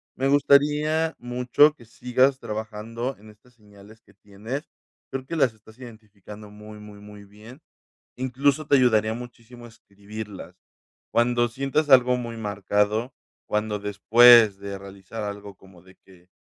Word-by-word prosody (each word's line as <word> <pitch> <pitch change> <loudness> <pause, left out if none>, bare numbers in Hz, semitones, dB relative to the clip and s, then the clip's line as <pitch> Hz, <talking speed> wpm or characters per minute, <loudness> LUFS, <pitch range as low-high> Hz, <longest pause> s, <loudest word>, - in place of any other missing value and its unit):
Me 135 - -1
gustaría 150 +3 +2
mucho 125 +5 +2
que 125 -6 -19
sigas 130 +4 0
trabajando 115 +3 -6
en 110 +1 -17
estas 105 +4 -25
señales 105 0 -19
que 100 - -25
tienes, 105 - -8 0.4
creo 135 -1 -5
que 165 - -6
las 130 -6 +2
estás 110 +2 -20
identificando 105 -3 -13
muy, 105 +1 -13
muy, 105 -1 -13
muy 105 0 -13
bien. 105 +6 -15 0.6
Incluso, 135 +4 -1
te 145 - +3
ayudaría 110 -4 +2
muchísimo 120 0 -11
escribirlas. 100 -3 -11 0.6
Cuando 120 0 +1
sientas 135 +5 -2
algo 125 -2 +5
muy 115 -2 -7
marcado, 105 +3 -1 0.3
cuando 105 0 -2
después 110 +1 +5
de 100 0 -7
realizar 100 +3 -9
algo 100 -1 -7
como 95 -2 -19
de 95 +1 -20
que, 90 -1 -21
110 Hz, 140 wpm, -24 LUFS, 105-125 Hz, 0.6 s, algo